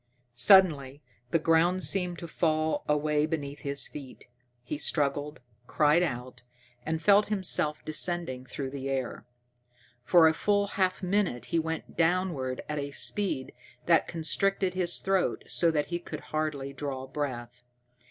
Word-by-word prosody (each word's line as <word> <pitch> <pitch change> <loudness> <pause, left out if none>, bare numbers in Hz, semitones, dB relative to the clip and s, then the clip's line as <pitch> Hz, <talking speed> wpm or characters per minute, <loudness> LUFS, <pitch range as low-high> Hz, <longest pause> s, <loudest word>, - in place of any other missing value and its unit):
Suddenly 145 0 +4 0.3
the 165 - +3
ground 165 +3 +2
seemed 180 -3 0
to 170 - -7
fall 155 -1 0
away 150 0 +1
beneath 145 -3 -4
his 140 0 -1
feet. 140 -3 -10 0.4
He 145 +4 -5
struggled, 145 0 0 0.3
cried 150 +2 +3
out, 125 -6 -4 0.4
and 160 +3 -2
felt 200 +5 +4
himself 180 -7 -1
descending 155 -5 0
through 135 0 -5
the 135 -1 -5
air. 130 -2 -3 0.8
For 170 +3 +6
a 160 - +3
full 205 +4 +1
half 185 -1 -1
minute 180 - 0
he 165 - +3
went 160 0 -5
downward 165 -7 0
at 150 -1 -3
a 140 0 -4
speed 145 -2 -1 0.3
that 165 -1 +3
constricted 185 +3 0
his 180 -2 0
throat 190 -1 0
so 170 - +1
that 150 -2 0
he 175 - 0
could - - -8
hardly 150 -3 -2
draw 135 -1 -5
breath. 120 -4 -5
155 Hz, 140 wpm, -28 LUFS, 140-175 Hz, 0.8 s, For